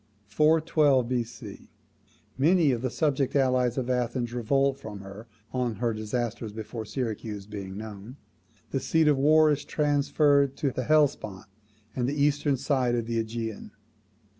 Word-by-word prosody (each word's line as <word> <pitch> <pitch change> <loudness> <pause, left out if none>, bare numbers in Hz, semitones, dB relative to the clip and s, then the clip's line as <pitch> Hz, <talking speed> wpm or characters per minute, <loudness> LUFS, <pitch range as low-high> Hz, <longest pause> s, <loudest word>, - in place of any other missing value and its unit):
412 150 -1 +3
B.C. 120 -4 -5 0.7
Many 155 +2 +3
of 120 -2 -1
the 130 - -1
subject 140 -1 0
allies 130 -3 +2
of 130 -2 -1
Athens 120 -1 -1
revolt 135 +3 +1
from 105 -6 -8
her, 100 +4 -10 0.3
on 125 -3 -1
her 115 +1 -1
disasters 110 +1 -3
before 110 +1 -6
Syracuse 110 -4 -4
being 100 -2 -7
known; 110 +3 -9 0.5
the - - 0
seat 160 -1 +2
of 145 -3 +3
war 155 +2 +5
is 145 0 -1
transferred 145 -1 +2
to 140 - 0
the 130 0 -4
Hellespont 145 -11 +1 0.5
and 125 0 0
eastern 145 -1 +1
side 130 -2 0
of 120 -2 -1
the 115 0 -1
AEgean. 110 -1 -6
125 Hz, 140 wpm, -27 LUFS, 110-145 Hz, 0.7 s, war